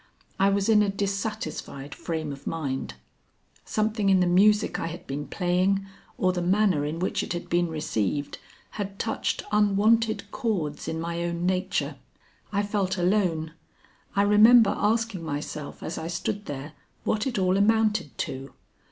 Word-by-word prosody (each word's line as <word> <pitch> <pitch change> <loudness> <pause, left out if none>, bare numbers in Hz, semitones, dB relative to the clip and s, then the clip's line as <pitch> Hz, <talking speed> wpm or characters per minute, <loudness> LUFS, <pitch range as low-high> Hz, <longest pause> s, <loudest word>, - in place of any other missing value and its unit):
I 195 +1 +5
was 200 0 +1
in 215 -2 +5
a 205 - +2
dissatisfied 195 -8 -4
frame 160 -3 -4
of 135 - -11
mind. 135 - -3 0.7
Something 215 -1 0
in 190 -1 +5
the 180 - +3
music 205 +4 +4
I - - -2
had 165 +1 -7
been 145 +2 -4
playing 185 +2 +1 0.3
or 185 0 +2
the 180 - -2
manner 185 -3 +2
in 150 +2 -3
which 180 +2 -1
it - - -3
had 175 - -5
been 175 0 +2
received 145 - -2 0.4
had 195 0 -5
touched 220 - -2
unwonted 210 +2 +2
chords 170 -11 -2
in 160 - -2
my 170 +1 -3
own 170 0 -2
nature. 185 +1 -1 0.5
I 205 0 +1
felt 200 -2 -1
alone. 175 -4 +1 0.6
I 200 - +4
remember 210 +1 +7
asking 220 -3 0
myself 150 -1 -5
as 165 - -4
I 160 - -4
stood 200 +4 -3
there, 145 +2 -6 0.3
what 215 +4 0
it 245 - -2
all 185 -1 +2
amounted 210 - +2
to? 135 +1 -7
185 Hz, 155 wpm, -26 LUFS, 160-210 Hz, 0.7 s, remember